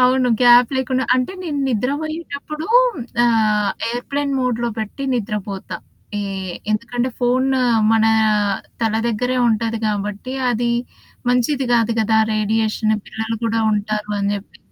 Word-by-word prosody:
అవును. 255 0 +4
గ్యాప్ 245 0 +7
లేకుండా 260 0 0
అంటే 255 +7 0
నేను 300 -5 -3
నిద్రపోయ్యేటప్పుడు 300 +4 -3 0.6
ఆహ్, 215 -3 +2 0.2
ఎయిర్‌ప్లేన్ 280 +4 -2
మోడ్‌లో 240 -2 0
పెట్టి 220 +6 -4
నిద్రపోతా. 205 -3 -4 0.4
ఏ - - -1 0.5
ఎందుకంటే, 240 +3 -1
ఫోను 260 +2 +2 0.3
మన 220 -1 +4 0.8
తల 225 -2 +1
దెగ్గరే 245 +3 0
ఉంటది 225 0 0
కాబట్టి, 210 +3 -3 0.2
అది 240 0 0 0.6
మంచిది 250 +3 +1
గాదు 230 -1 +3
కదా! 220 0 +2 0.2
రేడియేషను 215 0 +1
పిల్లలు 220 +1 -4
కూడా 225 0 +1
ఉంటారు 210 0 -2
అని 200 0 0
చెప్పి 200 0 -9
235 Hz, 120 wpm, -20 LUFS, 215-255 Hz, 0.8 s, గ్యాప్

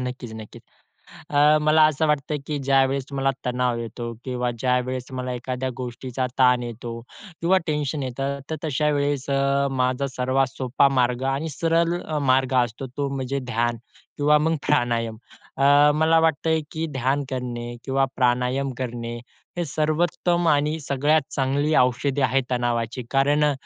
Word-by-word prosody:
नक्कीच, 125 -2 -5
नक्कीच. 110 -1 -10 0.7
अ, 150 +1 +5
मला 155 +1 +5
असं 155 +1 +1
वाटतं 150 0 0
की 150 -1 -2
ज्यावेळेस 135 0 +2
मला 135 0 +1 0.2
तणाव 125 -1 0
येतो 115 +1 -5
किंवा 125 -1 -2
ज्यावेळेस 125 +1 -1
मला 125 0 -3
एखाद्या 125 +1 -3
गोष्टीचा 130 +1 -4
ताण 125 -1 +4
येतो 120 0 -6 0.5
किंवा 185 +3 +4
टेन्शन 150 -1 -1
येतं, 135 +2 -3
तर 160 - -1
तशा 150 0 +1
वेळेस 145 -1 -1
अ, 140 0 +2
माझा 130 +1 0
सर्वात 130 +1 +2
सोपा 135 +2 +2
मार्ग 125 +1 +1
आणि 160 +4 -3
सरळ 165 +3 +1 0.4
मार्ग 130 0 +1
असतो, 120 +3 -7
तो 140 +3 -3
म्हणजे 135 +1 -2
ध्यान 120 +1 0 0.4
किंवा 150 +1 +4
मग 160 +2 +1
प्राणायाम. 115 -5 +1 0.4
अ, 145 +2 +5
मला 160 +2 +4
वाटतंय 160 0 +1
की 160 +1 -2
ध्यान 135 +2 0
करणे 120 -2 -4
किंवा 135 0 +1
प्राणायाम 125 +2 +1
करणे 120 -2 -4 0.4
ही 175 - 0
सर्वोत्तम 170 +3 0
आणि 150 +1 +2
सगळ्यात 145 +2 +2
चांगली 140 +3 0
औषधी 130 +3 +1
आहेत 130 +1 +2
तणावाची. 120 0 -1
कारण 145 +2 +3
अ, 150 - +3
135 Hz, 145 wpm, -23 LUFS, 125-150 Hz, 0.7 s, अ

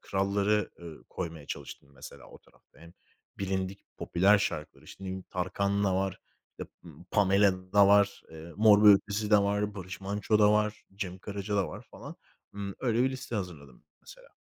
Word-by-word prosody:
kralları, 100 +2 0
ııı, 85 -2 -11
koymaya 80 -5 -6
çalıştım 70 - -8
mesela 65 - -12
o - - -14
tarafta. - - -27
Hem, 85 +1 -14 0.5
bilindik 95 0 -3
popüler 100 +4 +3
şarkıları. 75 -6 -4
İşte 95 - -12
ne - - -5
bileyim 95 0 -6
Tarkan 100 +2 -1
da 95 - +1
var, 95 -1 -2 0.3
işte, - - -10
ımm, 80 0 -14
Pamela 95 -2 +2
da 100 -1 +6
var, 100 0 +3
eee, 80 +1 -11
Mor 105 -1 +6
ve - - +10
Ötesi 105 +2 -2
de 105 - +8
var, 100 +1 0
Barış 95 -1 -8
Manço 100 +2 0
da 105 0 +6
var, 105 0 0
Cem 95 -2 -5
Karaca 100 +1 -4
da 95 - +1
var - - -9
falan. - - -10 0.4
Imm, 100 -1 -5
öyle 120 -1 +1
bir 130 - +1
liste 130 -2 -7
hazırladım 80 -9 -8 0.2
mesela. - - -15
100 Hz, 180 wpm, -29 LUFS, 95-105 Hz, 0.5 s, ve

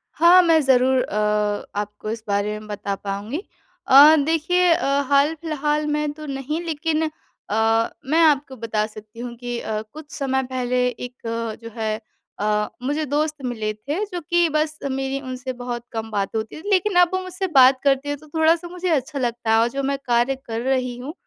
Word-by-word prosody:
हाँ, 350 +2 +7
मैं 330 -2 +5
ज़रूर 260 -1 +3
अ, - - -6 0.6
आपको 210 +1 -5
इस 220 0 -4
बारे 205 +1 0
में 215 - -12
बता 200 -1 -3
पाऊँगी। 200 +7 -4 0.5
अ, 285 +4 +9
देखिए 340 +3 +2
अ, 350 - -1 0.2
हाल-फिलहाल 300 +1 +1
में 300 0 0
तो 305 0 -10
नहीं 280 +3 -3
लेकिन 320 0 -1 0.5
अ, 225 +1 +2 0.2
मैं 310 +5 +2
आपको 285 -3 +2
बता 220 -2 -1
सकती 215 +1 -13
हूँ 240 0 -6
कि 245 -1 -4
अ, 215 -2 -3
कुछ 305 -1 -11
समय 265 -1 -1
पहले 250 0 +1
एक 245 0 -8 0.5
जो 230 - -7
है 220 -1 -1 0.4
अ, 210 0 +1 0.2
मुझे 295 +4 -1
दोस्त 300 +1 -1
मिले 220 -3 -2
थे, 290 - -3
जो 360 -3 -5
कि 345 0 +4
बस 305 0 -1
मेरी 270 +1 -2
उनसे 255 -1 -5
बहुत 245 -1 -5
कम 225 -1 -5
बात 200 0 -2
होती 220 +8 -4
थी। 410 - -6
लेकिन 390 0 +2
अब 355 - +6
वो 375 - +1
मुझसे 370 +1 -4
बात 260 0 +7
करते 280 0 +2
हैं 290 - -2
तो 310 - -17
थोड़ा-सा 325 +2 +3
मुझे 360 +1 -4
अच्छा 290 -2 0
लगता 235 -2 -1
है, 225 - +5
और 235 - +3
जो 275 +3 -3
मैं 280 - 0
कार्य 240 +2 +2
कर 225 0 -4
रही 255 -1 -1
हूँ 265 +5 -7
265 Hz, 190 wpm, -22 LUFS, 230-310 Hz, 0.6 s, अ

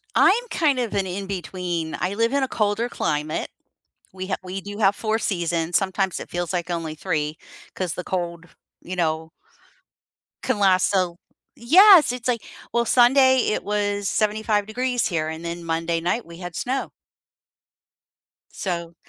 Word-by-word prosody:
I'm 410 +5 +4
kind 290 -6 +2
of 240 -3 -2
an 195 -1 0
in-between. 180 -3 -4
I 185 +3 -1
live 230 +3 +1
in 280 -1 +1
a 265 - 0
colder 215 +2 0
climate. 155 -6 -2 0.6
We 185 0 -6
ha 195 - 0
We 185 +1 -5
do 205 +2 -8
have 200 -1 +4
4 220 0 0
seasons, 170 -5 -1
sometimes 190 -1 0
it - - -9
feels 175 -1 -3
like 175 -1 -2
only 165 -2 -3
3, 155 -3 -2 0.4
'cause 180 -4 -3
the 180 - -6
cold, 175 -1 -3 0.4
you 185 +1 -6
know 160 -1 -1 1.1
can 255 -5 0
last 190 -2 +4
so 195 - +2
l 175 -2 -3 0.4
Yes, 335 - +7
it's 250 -1 -5
like, 235 -4 0 0.3
well, 235 0 +3
Sunday 260 +2 +5
it - - -2
was 205 -1 -1
75 215 -1 0
degrees 245 +2 -1
here, 160 -5 -1
and 160 +1 -6
then 170 0 -5
Monday 165 0 -1
night 180 +7 -1
we 170 - -11
had 175 -2 -7
snow. 255 +11 -2 1.6
So 170 -3 -4
190 Hz, 160 wpm, -23 LUFS, 170-230 Hz, 1.6 s, Yes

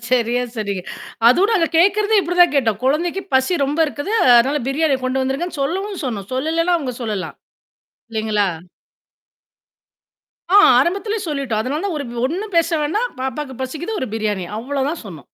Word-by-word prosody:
சரியா 245 0 +2
சொன்னீங்க. 200 -4 -3 0.5
அதோட 380 - +4
அத 330 - +2
கேட்கிறதே 410 +4 +4
இப்பிடி 355 0 -3
தான் 350 - +6
கேட்டோம். 230 -7 +1
குழந்தைக்கு 335 +8 0
பசி 265 +7 +2
ரொம்ப 290 +4 -2
இருக்குது. 290 +6 -5 0.3
அதனால 275 +4 +2
பிரியாணிய 280 0 +1
கொண்டு 260 +1 0
வந்துருங்கன்னு 275 +4 -3
சொல்லவும் 380 +5 -3
சொன்னோம். 205 -5 -5
சொல்லலேன்னா 330 +6 +1
அவுங்க 255 -5 -4
சொல்லலாம். 210 -5 -4 0.7
இல்லேங்களா! 215 -2 0 2.1
ஆ, - - +9 0.2
ஆரம்பத்திலே 400 +8 -1
சொல்லிட்டோம். 270 -7 -2
அதனால 285 +7 -3
தான் 390 -5 -2
ஒரு 285 - -3
வ் 240 -1 -5
ஒண்ணும் 380 +6 -5
பேச 335 0 +4
வேணாம். 415 +12 0
பாப்பாவுக்கு 265 -1 -4
பசிக்குது 330 +11 -4
ஒரு 260 - -3
பிரியாணி 210 -4 -2
அவ்ளோதான் 280 +5 -3
சொன்னோம். 170 -8 -10
280 Hz, 150 wpm, -19 LUFS, 245-345 Hz, 2.1 s, ஆ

